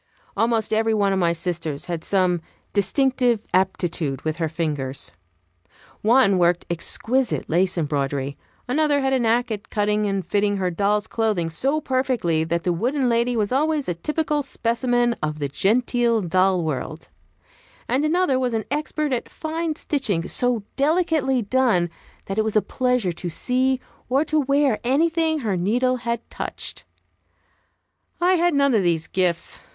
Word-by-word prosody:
Almost 225 Hz, -1 st, +1 dB
every 220 Hz, 0 st, +2 dB
one 200 Hz, -2 st, +2 dB
of 190 Hz, -, 0 dB
my 170 Hz, -2 st, +3 dB
sisters 165 Hz, -4 st, -3 dB
had 170 Hz, -2 st, -4 dB
some 180 Hz, -3 st, +1 dB, 0.3 s
distinctive 245 Hz, +2 st, +2 dB
aptitude 175 Hz, -7 st, 0 dB
with 155 Hz, 0 st, -2 dB
her 165 Hz, -2 st, -1 dB
fingers. 145 Hz, -, -2 dB, 0.9 s
One 215 Hz, -4 st, +4 dB
worked 175 Hz, 0 st, +2 dB
exquisite 230 Hz, +8 st, -1 dB
lace 180 Hz, +3 st, +1 dB
embroidery; 140 Hz, -3 st, -1 dB, 0.3 s
another 290 Hz, +2 st, +2 dB
had 265 Hz, 0 st, +1 dB
a 260 Hz, -, +3 dB
knack 235 Hz, +1 st, +1 dB
at 210 Hz, -1 st, -5 dB
cutting 210 Hz, 0 st, +1 dB
and 195 Hz, -2 st, -2 dB
fitting 205 Hz, 0 st, +1 dB
her 185 Hz, -2 st, 0 dB
doll's 205 Hz, +4 st, +1 dB
clothing 215 Hz, -8 st, -1 dB
so 275 Hz, -, 0 dB
perfectly 255 Hz, -, 0 dB
that 165 Hz, +1 st, -1 dB
the 180 Hz, -, +1 dB
wooden 250 Hz, -, 0 dB
lady 235 Hz, +1 st, +1 dB
was 210 Hz, 0 st, 0 dB
always 300 Hz, +2 st, +1 dB
a 175 Hz, -, 0 dB
typical 300 Hz, -, -1 dB
specimen 240 Hz, -2 st, 0 dB
of 155 Hz, 0 st, -2 dB
the 145 Hz, -2 st, -2 dB
genteel 235 Hz, -, +1 dB
doll 185 Hz, 0 st, +2 dB
world; 155 Hz, +1 st, -4 dB, 0.8 s
and 260 Hz, +4 st, +1 dB
another 310 Hz, -4 st, +2 dB
was 250 Hz, -3 st, 0 dB
an 220 Hz, -, -2 dB
expert 300 Hz, -1 st, -1 dB
at 245 Hz, -, -3 dB
fine 320 Hz, 0 st, -3 dB
stitching, 220 Hz, -, -1 dB
so 245 Hz, -4 st, 0 dB
delicately 295 Hz, -4 st, +1 dB
done 205 Hz, -7 st, +2 dB, 0.3 s
that 195 Hz, +2 st, -2 dB
it -, -, +3 dB
was 220 Hz, 0 st, -2 dB
a 215 Hz, -, +5 dB
pleasure 250 Hz, -7 st, 0 dB
to 175 Hz, +1 st, -5 dB
see 255 Hz, +8 st, +1 dB, 0.3 s
or 275 Hz, +5 st, +2 dB
to 310 Hz, 0 st, +1 dB
wear 280 Hz, -4 st, +2 dB
anything 315 Hz, +4 st, +1 dB
her 210 Hz, -5 st, -1 dB
needle 245 Hz, +8 st, +1 dB
had 235 Hz, -1 st, -3 dB
touched. -, -, -6 dB, 1.3 s
I 355 Hz, +2 st, +3 dB
had 345 Hz, -2 st, +2 dB
none 280 Hz, -1 st, +3 dB
of 215 Hz, -, +4 dB
these 170 Hz, -3 st, +1 dB
gifts. 180 Hz, -2 st, -1 dB
225 Hz, 155 wpm, -23 LUFS, 175-265 Hz, 1.3 s, a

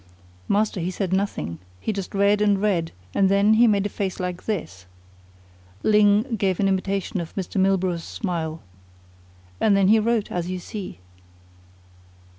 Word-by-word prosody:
"Master, 205 Hz, -1 st, +1 dB
he 175 Hz, +1 st, -2 dB
said 185 Hz, -1 st, -2 dB
nothing. 85 Hz, -, -2 dB, 0.2 s
He 215 Hz, -, -2 dB
just 195 Hz, -1 st, -5 dB
read 200 Hz, +1 st, +3 dB
and 205 Hz, -2 st, +3 dB
read, 185 Hz, -6 st, 0 dB, 0.2 s
and 195 Hz, -1 st, +3 dB
then 200 Hz, +2 st, +4 dB
he 235 Hz, +2 st, +5 dB
made 200 Hz, -2 st, +2 dB
a -, -, -1 dB
face 195 Hz, -2 st, -3 dB
like 180 Hz, -1 st, -4 dB
this." 95 Hz, -, -4 dB, 1.0 s
Ling 210 Hz, +3 st, +3 dB
gave 190 Hz, -3 st, 0 dB
an 200 Hz, -, +2 dB
imitation 195 Hz, 0 st, -1 dB
of 165 Hz, -, -9 dB
Mr. 190 Hz, 0 st, -2 dB
Milburgh's 185 Hz, -3 st, +1 dB
smile. 165 Hz, -, -4 dB, 1.0 s
"And 200 Hz, -2 st, +3 dB
then 195 Hz, -1 st, +4 dB
he 220 Hz, +1 st, +6 dB
wrote 225 Hz, -1 st, 0 dB
as 175 Hz, 0 st, -2 dB
you 185 Hz, -, -2 dB
see." 190 Hz, +2 st, -7 dB
195 Hz, 155 wpm, -23 LUFS, 180-210 Hz, 1.0 s, he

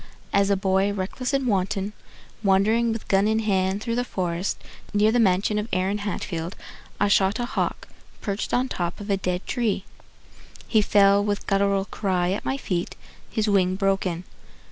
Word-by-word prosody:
As 200 Hz, 0 st, +3 dB
a 200 Hz, -, +4 dB
boy 190 Hz, +1 st, +2 dB
reckless 205 Hz, +7 st, -3 dB
and 275 Hz, -1 st, +1 dB
wanton, 200 Hz, -1 st, 0 dB, 0.5 s
Wandering 215 Hz, +4 st, +3 dB
with 225 Hz, -1 st, -5 dB
gun 195 Hz, +1 st, +3 dB
in 220 Hz, 0 st, +2 dB
hand 195 Hz, -2 st, 0 dB
through 230 Hz, -, -2 dB
the 245 Hz, +1 st, +1 dB
forest 180 Hz, -4 st, -2 dB, 0.4 s
Near 210 Hz, +1 st, +4 dB
the 240 Hz, -, +2 dB
mansion 205 Hz, 0 st, +2 dB
of 210 Hz, -, -3 dB
Aaron 190 Hz, +2 st, 0 dB
Hatfield, 180 Hz, -4 st, -4 dB, 0.4 s
I 205 Hz, -, +3 dB
shot 195 Hz, 0 st, +3 dB
a 240 Hz, -, -1 dB
hawk -, -, -2 dB, 0.3 s
perched 200 Hz, -1 st, -3 dB
on 250 Hz, -, +2 dB
the -, -, -5 dB
top 175 Hz, -1 st, -3 dB
Of 205 Hz, 0 st, -4 dB
a 195 Hz, -, +3 dB
dead 180 Hz, -1 st, -2 dB
tree. 220 Hz, -6 st, -1 dB, 0.8 s
He 220 Hz, -, +4 dB
fell 200 Hz, -1 st, +4 dB
with 205 Hz, 0 st, -2 dB
guttural 195 Hz, -1 st, +2 dB
cry 185 Hz, -4 st, 0 dB
At 195 Hz, -, -2 dB
my 265 Hz, -, 0 dB
feet, 180 Hz, -9 st, -3 dB, 0.3 s
his 220 Hz, -1 st, -1 dB
wing 185 Hz, -2 st, +3 dB
broken. 195 Hz, -3 st, 0 dB
200 Hz, 175 wpm, -24 LUFS, 190-215 Hz, 0.8 s, a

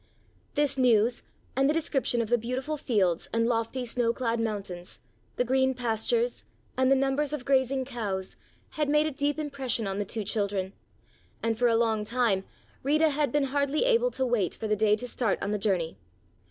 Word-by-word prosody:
This 285 Hz, -2 st, +1 dB
news 235 Hz, -1 st, +3 dB, 0.3 s
and 270 Hz, +2 st, +3 dB
the 305 Hz, -, +2 dB
description 270 Hz, -7 st, 0 dB
of 220 Hz, -, -7 dB
the 240 Hz, -, +4 dB
beautiful 255 Hz, +6 st, -3 dB
fields 200 Hz, -, 0 dB
and 230 Hz, 0 st, +1 dB
lofty 235 Hz, +2 st, -1 dB
snow 235 Hz, 0 st, 0 dB
clad 235 Hz, -2 st, -1 dB
mountains, 200 Hz, -5 st, -4 dB, 0.4 s
the -, -, +1 dB
green 265 Hz, +1 st, +2 dB
pastures 250 Hz, -, 0 dB, 0.3 s
and 260 Hz, 0 st, +3 dB
the 270 Hz, -, +6 dB
numbers 275 Hz, +2 st, 0 dB
of 275 Hz, -4 st, -4 dB
grazing 265 Hz, -1 st, +2 dB
cows, 205 Hz, -7 st, -4 dB, 0.4 s
had 300 Hz, -2 st, -1 dB
made 300 Hz, +1 st, +4 dB
a 310 Hz, -, -1 dB
deep 285 Hz, +1 st, -1 dB
impression 275 Hz, -7 st, -2 dB
on 195 Hz, 0 st, -2 dB
the -, -, +1 dB
two 215 Hz, +2 st, -4 dB
children, 200 Hz, -2 st, -1 dB, 0.7 s
and 225 Hz, 0 st, +1 dB
for 245 Hz, -, +4 dB
a 230 Hz, -, +3 dB
long 225 Hz, -2 st, +1 dB
time 215 Hz, -4 st, +1 dB, 0.4 s
Rita 305 Hz, +3 st, +3 dB
had 290 Hz, -2 st, 0 dB
been 295 Hz, +1 st, +2 dB
hardly 285 Hz, -, +1 dB
able -, -, +3 dB
to 265 Hz, -, -1 dB
wait 230 Hz, -8 st, 0 dB
for 220 Hz, -, -4 dB
the 210 Hz, -, +2 dB
day 210 Hz, 0 st, +3 dB
to 250 Hz, +4 st, -5 dB
start 235 Hz, -4 st, 0 dB
on 200 Hz, -, -2 dB
the 210 Hz, -, -1 dB
journey. 185 Hz, -6 st, 0 dB
245 Hz, 190 wpm, -28 LUFS, 215-275 Hz, 0.7 s, the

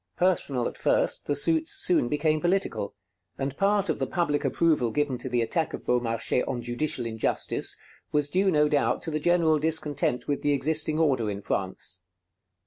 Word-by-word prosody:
Personal 145 Hz, -9 st, +1 dB
at -, -, -7 dB
first, -, -, +1 dB
the 145 Hz, -, +1 dB
suits 160 Hz, +2 st, +2 dB
soon 175 Hz, -9 st, +3 dB
became 155 Hz, +1 st, +1 dB
political; 175 Hz, -, -1 dB, 0.4 s
and 135 Hz, 0 st, -3 dB
part 200 Hz, +3 st, +2 dB
of -, -, -1 dB
the -, -, -1 dB
public 160 Hz, -5 st, 0 dB
approval 155 Hz, -8 st, +2 dB
given 140 Hz, -1 st, -1 dB
to 130 Hz, -, -4 dB
the 120 Hz, -1 st, +1 dB
attack 160 Hz, +7 st, -1 dB
of -, -, -12 dB
Beaumarchais 120 Hz, 0 st, 0 dB
on 125 Hz, -, -2 dB
judicial 125 Hz, +1 st, -2 dB
injustice 110 Hz, -1 st, -1 dB, 0.3 s
was 150 Hz, -1 st, +1 dB
due 190 Hz, +6 st, +2 dB
no 150 Hz, -4 st, +3 dB
doubt 145 Hz, -1 st, +1 dB
to 160 Hz, -, -3 dB
the 155 Hz, -, -1 dB
general 165 Hz, -2 st, +3 dB
discontent 150 Hz, -5 st, 0 dB
with 145 Hz, -, -1 dB
the 145 Hz, -, +2 dB
existing 155 Hz, +2 st, 0 dB
order 135 Hz, -9 st, +1 dB
in 100 Hz, 0 st, -5 dB
France. 95 Hz, -1 st, -3 dB
150 Hz, 175 wpm, -26 LUFS, 125-160 Hz, 0.4 s, soon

